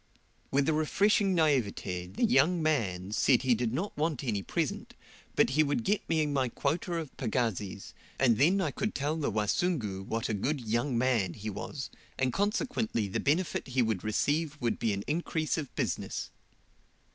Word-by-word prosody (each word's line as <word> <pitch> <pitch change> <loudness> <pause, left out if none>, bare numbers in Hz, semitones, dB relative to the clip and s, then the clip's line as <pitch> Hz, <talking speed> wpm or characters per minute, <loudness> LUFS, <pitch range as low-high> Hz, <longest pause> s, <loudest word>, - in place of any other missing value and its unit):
With 140 0 +2
a 160 - +3
refreshing 195 +5 +2
naivete, 110 - +1
the 95 - -4
"young 180 -6 +4
man" 105 - 0
said 125 +4 +3
he 130 -2 +4
did 115 0 0
not 175 - -3
want 150 -2 -1
any 110 -6 -1
present, - - -3 0.5
he 145 +4 +3
would 155 +10 +1
get 210 -1 0
me 160 -2 +2
my 135 -4 0
quota 170 +7 -1
of 160 -4 -5
pagazis, 110 -5 -2 0.2
and 120 -5 +4
then 180 +8 +4
I 160 -6 0
could 210 +9 -3
tell 145 +3 0
the 155 -3 -1
"Wasungu" 105 - 0
what 115 +3 -2
a 110 - -1
good 135 +9 -1
"young 120 +3 0
man" 115 -8 +1
he 105 +1 -5
was, 135 +7 -6 0.3
and 130 -2 +1
consequently 210 - 0
the - - -1
benefit 160 +4 0
he 130 -1 +2
would 110 -5 -1
receive 150 +8 0
would 120 -3 -1
be 115 - +1
an 100 0 -2
increase 155 0 -1
of 150 -5 -4
business. - - -2
135 Hz, 170 wpm, -30 LUFS, 110-160 Hz, 0.5 s, young